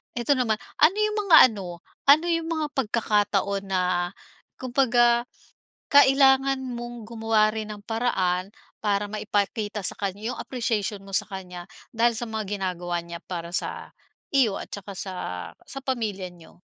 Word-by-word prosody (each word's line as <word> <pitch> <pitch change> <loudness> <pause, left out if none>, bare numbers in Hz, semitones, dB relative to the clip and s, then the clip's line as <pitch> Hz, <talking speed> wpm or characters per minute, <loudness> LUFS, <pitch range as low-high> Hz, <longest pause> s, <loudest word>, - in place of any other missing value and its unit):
Eto 240 +3 -1
naman, 250 -5 +2 0.2
ano 315 +6 +6
'yong 425 0 0
mga 325 -4 +9
ano, 180 -5 -8 0.2
ano 300 +4 +7
'yong 330 -1 0
mga 315 -2 -1
pagkakataon 205 -5 0
na, 190 -1 +1 0.7
kumbaga, 240 -2 +2 0.7
kailangan 270 -1 +5
mong 240 -2 -6
gumawa 220 -1 +1
rin 220 -1 -4
ng 205 - -16
paraan, 190 -6 0 0.3
para 205 -1 -1
maipakita 210 0 -2
sa - - +1
kanya 205 +4 -3
'yong - - -8
appreciation 215 -5 -2
mo 195 - -12
sa 210 +2 +1
kanya, 180 -3 -8 0.3
dahil 235 +1 +2
sa 240 - -2
mga 210 -2 -3
ginagawa 175 -2 -2
niya 170 0 -7
para 170 -2 -5
sa, - - -3 0.4
iyo 255 -8 +3
at - - -7
tsaka 200 -1 -7
sa, 190 0 -3 0.5
sa 275 - -5
pamilya 210 -8 -2
niyo? 170 0 -18
215 Hz, 145 wpm, -25 LUFS, 195-250 Hz, 0.7 s, mga